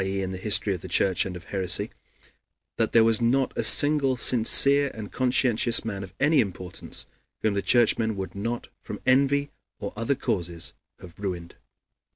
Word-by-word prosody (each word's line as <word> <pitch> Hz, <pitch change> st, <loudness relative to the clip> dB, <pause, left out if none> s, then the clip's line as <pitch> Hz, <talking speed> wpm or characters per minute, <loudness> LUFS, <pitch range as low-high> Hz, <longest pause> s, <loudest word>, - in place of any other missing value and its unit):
e., 95 Hz, 0 st, -3 dB
in 95 Hz, -, -4 dB
the 95 Hz, -, -6 dB
history 105 Hz, 0 st, +1 dB
of 90 Hz, -, -7 dB
the -, -, -9 dB
Church 95 Hz, +1 st, 0 dB
and 90 Hz, -, -7 dB
of 90 Hz, -, -10 dB
heresy), 95 Hz, -3 st, -1 dB, 0.9 s
that 115 Hz, -, 0 dB
there 115 Hz, -, +5 dB
was 115 Hz, 0 st, +2 dB
not 130 Hz, +3 st, 0 dB
a -, -, -2 dB
single 145 Hz, -3 st, +4 dB
sincere 140 Hz, +4 st, +4 dB
and 105 Hz, -2 st, -8 dB
conscientious 125 Hz, -2 st, +1 dB
man 100 Hz, -3 st, -5 dB
of 95 Hz, -, -10 dB
any 150 Hz, +2 st, +3 dB
importance 95 Hz, -5 st, -4 dB, 0.4 s
whom 110 Hz, -, +1 dB
the 100 Hz, -, -1 dB
Churchmen 110 Hz, -2 st, +2 dB
would 95 Hz, -1 st, -6 dB
not 115 Hz, +4 st, -5 dB
from -, -, -8 dB
envy 140 Hz, +2 st, +2 dB, 0.3 s
or -, -, -7 dB
other 115 Hz, +6 st, -1 dB
causes 85 Hz, -7 st, -3 dB, 0.3 s
have 90 Hz, -1 st, -14 dB
ruined." 90 Hz, -4 st, -6 dB
110 Hz, 175 wpm, -25 LUFS, 95-130 Hz, 0.9 s, there